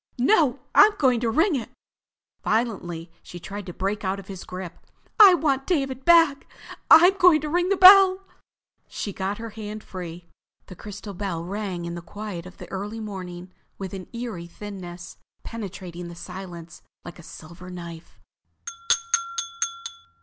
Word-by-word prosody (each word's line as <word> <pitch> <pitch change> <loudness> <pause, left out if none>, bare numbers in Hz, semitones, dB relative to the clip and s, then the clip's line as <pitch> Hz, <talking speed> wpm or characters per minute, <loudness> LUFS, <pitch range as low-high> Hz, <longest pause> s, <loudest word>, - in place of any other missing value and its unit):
"No! 265 - +3 0.2
I'm 420 +1 +7
going 255 -4 +3
to 235 -1 0
ring 320 - +2
it." 245 - -4 0.7
Violently 180 -7 -2
she 175 - -10
tried 200 +2 -8
to - - -5
break 195 +4 -3
out 190 +1 -1
of 195 - -13
his 190 -2 -8
grip. 185 -2 -8 0.4
"I 395 -4 +10
want 275 -5 0
David 270 -6 -1
back! 330 -5 +5 0.4
I'm 355 +4 +8
going 355 -4 +6
to 305 - -4
ring 350 +3 +1
the 395 - +2
bell!" 380 0 +8 0.6
She 205 - -5
got 195 +2 -3
her 230 -1 -7
hand 215 0 -7
free. 175 -2 -8 0.4
The 185 - -11
crystal 205 +1 -9
bell 180 -3 -4
rang 190 -2 -4
in 170 - -5
the 175 - -6
quiet 185 0 -7
of 180 - -14
the - - -10
early 205 +3 -5
morning 185 -4 -7 0.3
with 190 -1 -6
an 190 -2 -7
eerie 235 -8 -6
thinness, 180 -2 -9 0.3
penetrating 185 -5 -7
the 170 - -9
silence 170 -2 -9 0.2
like 175 - -10
a - - -10
silver 170 +3 -12
knife. 170 -2 -10
200 Hz, 155 wpm, -24 LUFS, 175-255 Hz, 0.7 s, I